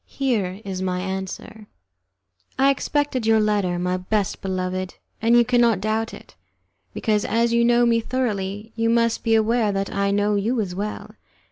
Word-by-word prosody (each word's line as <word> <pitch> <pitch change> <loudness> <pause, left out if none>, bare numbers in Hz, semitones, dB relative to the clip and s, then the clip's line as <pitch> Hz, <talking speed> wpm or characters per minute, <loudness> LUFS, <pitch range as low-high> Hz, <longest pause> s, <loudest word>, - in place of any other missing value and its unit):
Here 215 -8 -2
is 190 -1 -4
my 180 -1 -1
answer: 190 +3 -6 0.9
"I 275 +1 +5
expected 275 -3 -1
your 220 0 +5
letter, 205 -4 +1
my 180 +1 -1
best 195 +2 -2
beloved, 185 -1 -3 0.3
and 230 +2 +4
you 240 - +5
cannot 240 -3 +3
doubt 220 +2 -1
it, - - -13 0.6
because, 210 -2 0
as 235 +1 +1
you 235 0 +3
know 240 0 +4
me 230 -1 +3
thoroughly, 215 -4 -3
you 230 0 +1
must 230 0 +1
be 225 -1 +3
aware 220 0 +2
that 195 0 -3
I 200 0 0
know 205 +1 +1
you 225 +5 0
as 195 -4 -2
well. 205 +3 -5
215 Hz, 165 wpm, -22 LUFS, 195-235 Hz, 0.9 s, I